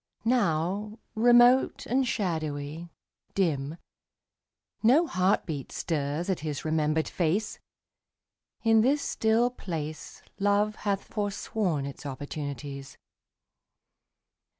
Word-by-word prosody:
Now, 210 -2 +1 0.2
remote 240 +3 +5
and 260 +1 +1
shadowy, 160 -6 -3 0.5
dim, 155 -5 0 1.0
No 265 +10 +5
heartbeat 180 - 0
stirs 150 +1 -2
at 190 -3 0
his 150 -1 -4
remembered 155 0 +1
face. 185 +6 -1 1.0
In 225 -1 +5
this 280 +5 +2
still 225 +2 +2
place 155 -9 -6 0.2
Love 205 +1 +2
hath 200 -2 -1
forsworn 200 -6 -2
its 140 +1 -7
opportunities. 140 0 -6
180 Hz, 85 wpm, -28 LUFS, 150-220 Hz, 1.0 s, remote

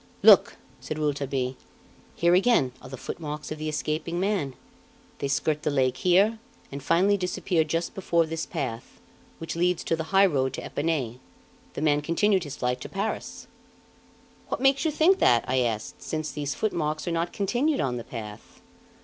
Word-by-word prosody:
"Look!" - - +7 0.2
said 155 - -5
Rouletabille, 140 -3 -1 0.6
"here 170 +1 +3
again 185 - +4
are 130 - -11
the 135 - -7
footmarks 150 +2 -6
of 155 - -5
the 155 0 -3
escaping 155 +3 -2
man; 185 -9 -1 0.6
they - - -1
skirt 150 +2 0
the - - 0
lake 130 -3 +1
here 200 +5 +3 0.3
and 140 +1 -6
finally 185 +8 +3
disappear 180 -2 0
just 165 +2 -2
before 170 -3 +1
this 165 0 -4
path, 115 -4 -5 0.4
which 165 - -5
leads 180 +1 +1
to 165 - 0
the 160 0 -4
high 195 +3 +5
road 135 -7 +1
to - - -5
Epinay. 145 -6 -2 0.6
The 150 - -3
man 145 -1 +3
continued 185 +4 +1
his 145 -1 -7
flight 125 0 -1
to - - -7
Paris." 200 +3 -4 1.0
"What - - -3
makes 270 +3 +3
you - - +3
think 330 +6 +3
that?" 120 -1 +4
I 130 +1 +1
asked, 115 -4 -2
"since 155 -1 -3
these 145 -1 -3
footmarks 155 -7 -2
are - - 0
not 170 +1 -1
continued 245 +9 0
on 125 -2 -1
the 120 - -5
path?" 110 -3 -9
155 Hz, 175 wpm, -26 LUFS, 135-180 Hz, 1.0 s, Look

